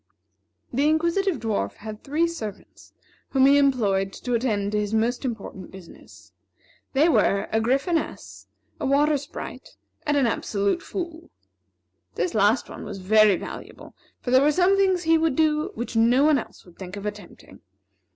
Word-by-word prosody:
The 280 +5 +2
Inquisitive 340 +2 +1
Dwarf 210 - -2
had 215 0 -9
three 310 +5 +1
servants 220 - -8 0.4
whom 265 -1 +3
he 280 +1 +6
employed 205 -9 +1
to 245 - -4
attend 215 -4 0
to 210 - 0
his 210 +1 -2
most 235 +4 0
important 210 -7 -6
business. 190 -3 -15 0.6
These 300 +5 +4
were 200 -8 +2
a 220 - +1
Gryphoness, 275 +8 -2 0.3
a - - -2
Water 295 +2 +3
Sprite, 280 +1 -8 0.3
and 295 0 +2
an 275 - +3
Absolute 205 - -1
Fool. 340 -2 -6 0.9
This 360 - -1
last 215 +3 +2
one - - -9
was 205 -2 -7
very 210 +1 +4
valuable; - - -9 0.3
for 245 - -4
there 260 +1 +6
were 295 +2 +4
some 365 +5 +3
things 380 -2 +2
he 325 0 +3
would 320 -4 +1
do 305 0 +1
which 235 +1 -5
no 235 +4 +4
one 300 -2 +4
else - - -11
would 175 -2 -19
think 185 +1 -7
of 200 - -7
attempting. 210 0 -9
255 Hz, 160 wpm, -24 LUFS, 210-310 Hz, 0.9 s, he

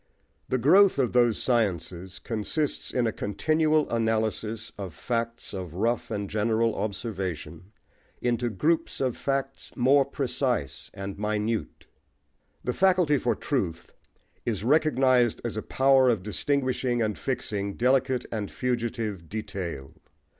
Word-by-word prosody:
The 130 - +2
growth 180 - +6
of 130 -4 +1
those 120 -3 +4
sciences 95 -5 -1
consists 120 - -2
in 125 -2 0
a 110 - +1
continual 155 +9 +1
analysis 110 -1 -1
of 95 -5 -7
facts 115 -2 -3
of 90 -4 -6
rough 115 +5 0
and 100 -2 -3
general 110 +2 +1
observation 95 -5 -4 0.5
into 120 0 0
groups 155 - 0
of 130 -3 0
facts 135 0 -3
more 135 +3 +5
precise 130 - -2
and 100 0 -6
minute. 105 +1 -2 0.8
The 125 - -1
faculty 180 -5 +3
for 120 - +1
truth 90 - -3 0.5
is 105 -4 -2
recognised 130 -4 +3
as 115 - -2
a 110 - -2
power 135 +1 +4
of 110 -6 +1
distinguishing 130 +1 0
and 105 -2 -1
fixing 105 -6 -3
delicate 130 0 +2
and 105 -3 -3
fugitive 115 -8 -2
detail. 95 -9 -5
115 Hz, 125 wpm, -27 LUFS, 105-130 Hz, 0.8 s, growth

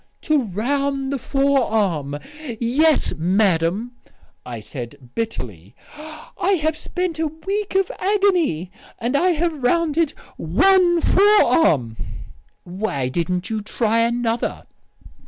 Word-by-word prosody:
"'To 300 -5 +2
round 275 +7 -1
the 275 - -2
forearm'! 220 - +1 0.4
Yes, 285 +6 +2
madam," 185 +4 +1 0.5
I 120 -2 -7
said 120 +2 -9
bitterly, 105 - -5 0.2
"I 330 +6 -4
have 310 +1 0
spent 340 +1 -3
a 320 - +1
week 390 +6 -4
of 385 -1 +2
agony... 365 - +1 0.3
and 240 +4 -2
I 355 +6 +3
have 320 -2 -1
rounded 320 +3 +1 0.2
one 345 - +3
forearm." 320 - +4 0.7
"Why 175 -8 -3
didn't 180 - -2
you 220 -1 -1
try 225 +2 0
another?" 235 0 -1
245 Hz, 105 wpm, -21 LUFS, -, 0.7 s, forearm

